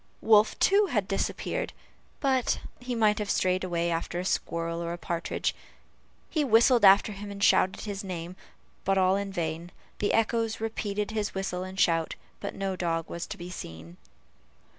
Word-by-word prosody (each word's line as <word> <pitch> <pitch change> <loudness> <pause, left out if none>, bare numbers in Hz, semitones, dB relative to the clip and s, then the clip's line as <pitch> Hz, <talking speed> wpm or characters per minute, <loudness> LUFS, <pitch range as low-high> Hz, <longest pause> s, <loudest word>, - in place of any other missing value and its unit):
Wolf, 215 -1 +4
too, 400 +1 +4
had 210 - 0
disappeared, 195 - -2 0.5
but 265 -3 +2 0.2
he 245 0 -4
might 215 -2 +3
have 210 -1 -3
strayed 185 -1 +1
away 170 -2 0
after 165 +1 -2
a 180 - -3
squirrel 170 -2 -1
or 170 0 -3
partridge. 170 -1 -2 0.7
He 310 - 0
whistled 235 -1 +5
after 200 +2 +7
him 205 0 -7
and 200 0 -5
shouted 185 - +4
his 205 -1 -5
name, 180 -2 -5 0.5
but 195 0 +2
all 185 0 +4
in 200 0 -2
vain; 170 -1 -3 0.3
the 205 - +1
echoes 225 0 +1
repeated 210 -2 -2
his 210 -2 -2
whistle 190 -1 -2
and 185 +1 -7
shout, 165 -3 +2 0.2
but 200 - -5
no 195 -1 -2
dog 165 -2 -1
was 170 - -4
to - - -6
be 175 +1 -8
seen. 85 - -9
195 Hz, 165 wpm, -28 LUFS, 175-215 Hz, 0.7 s, after